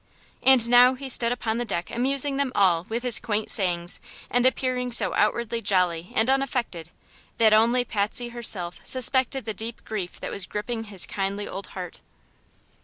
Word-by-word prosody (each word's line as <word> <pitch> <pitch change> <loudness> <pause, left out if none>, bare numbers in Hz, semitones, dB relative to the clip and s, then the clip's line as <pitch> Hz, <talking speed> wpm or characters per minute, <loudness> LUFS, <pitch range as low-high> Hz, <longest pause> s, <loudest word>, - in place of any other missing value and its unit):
And 255 -3 +4
now 245 +2 +6
he 270 +1 -7
stood 235 -1 +3
upon 230 -2 -2
the - - 0
deck 180 -6 -4
amusing 270 +3 +3
them 280 -2 0
all 180 -4 +3
with 235 +2 -3
his 245 -3 +3
quaint 210 -1 -2
sayings 175 -3 -1 0.3
and 245 +1 +3
appearing 255 -1 -1
so 235 - +1
outwardly 230 +2 0
jolly 180 -4 0
and 220 - +2
unaffected 250 - -1 0.5
that 220 -2 +5
only 235 +3 +4
Patsy 225 +2 -1
herself 205 -7 -2
suspected 260 +1 0
the 220 - -3
deep 225 +2 -7
grief 195 -5 -5
that - - -5
was 195 -2 -1
gripping 225 +2 -4
his 200 -4 -3
kindly 200 +1 -3
old 195 - -7
heart. 180 -2 -7
230 Hz, 170 wpm, -25 LUFS, 200-250 Hz, 0.5 s, now